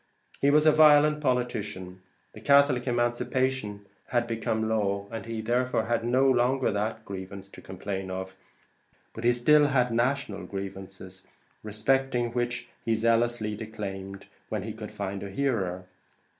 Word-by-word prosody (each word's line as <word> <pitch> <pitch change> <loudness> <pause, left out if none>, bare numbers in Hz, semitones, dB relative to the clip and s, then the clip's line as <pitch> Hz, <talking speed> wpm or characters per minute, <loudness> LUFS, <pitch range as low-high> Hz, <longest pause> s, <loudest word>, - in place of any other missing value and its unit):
He 140 - +4
was 150 +1 +4
a 155 - +7
violent 150 0 +6
politician; 105 -8 -2 0.3
the 110 - -12
Catholic 140 -1 +4
Emancipation 120 -3 -1 0.2
had 120 -1 +1
become 110 -1 -2
law, 100 -2 -1
and 115 0 -6
he 115 -1 -4
therefore 120 0 0
had 115 0 0
no 130 +3 +3
longer 130 +1 +2
that 110 +2 -3
grievance 95 0 -7
to - - -13
complain 95 0 -5
of; 95 0 -5 0.8
but 115 - -8
he 120 - +5
still 145 +5 +4
had 125 -4 +1
national 120 -5 -1
grievances, 95 -1 -8 0.3
respecting 120 +3 0
which 120 0 -2 0.2
he 115 - +1
zealously 115 -1 +1
declaimed, 100 -3 -7 0.2
when - - -3
he - - -5
could - - -8
find 100 -1 -5
a 100 - -6
hearer. 95 -7 -1
115 Hz, 145 wpm, -27 LUFS, 100-125 Hz, 0.8 s, a